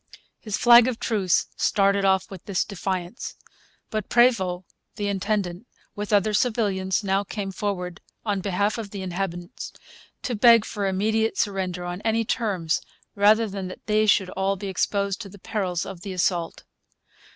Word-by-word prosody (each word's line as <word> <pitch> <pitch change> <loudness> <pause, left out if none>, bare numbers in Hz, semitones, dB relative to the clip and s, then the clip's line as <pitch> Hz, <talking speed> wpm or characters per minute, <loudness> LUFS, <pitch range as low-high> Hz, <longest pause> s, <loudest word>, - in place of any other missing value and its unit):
His 210 -2 -3
flag 240 0 +7
of 250 -3 -2
truce 195 -6 +1
started 200 0 +2
off 190 0 +2
with 190 -3 -10
this 195 -2 0
defiance. 190 +1 -4 0.6
But 215 -3 -3
Prevost 190 -7 +3 0.3
the 205 - -2
intendant, 200 0 -2 0.3
with 205 +1 -4
other 210 +1 +3
civilians, 205 -4 +1
now 195 0 +1
came 200 -1 -5
forward, 180 -3 -3 0.2
on 205 -3 0
behalf 200 +3 0
of 215 -3 -5
the 200 -1 -6
inhabitants, 175 -1 -5 0.5
to 250 - -2
beg 230 0 +6
for 200 -1 -2
immediate 220 +3 +1
surrender 190 -4 -1
on 175 +2 -5
any 225 +1 +1
terms, 190 -9 0 0.3
rather 215 +2 +4
than 195 -2 -5
that 185 - -10
they 215 0 +2
should 190 -2 +3
all 195 +1 0
be 195 +1 -5
exposed 200 +1 -1
to 200 - -8
the 205 - -13
perils 185 -3 -2
of 180 -3 -8
assault. 180 -3 -1
200 Hz, 155 wpm, -25 LUFS, 185-215 Hz, 0.6 s, flag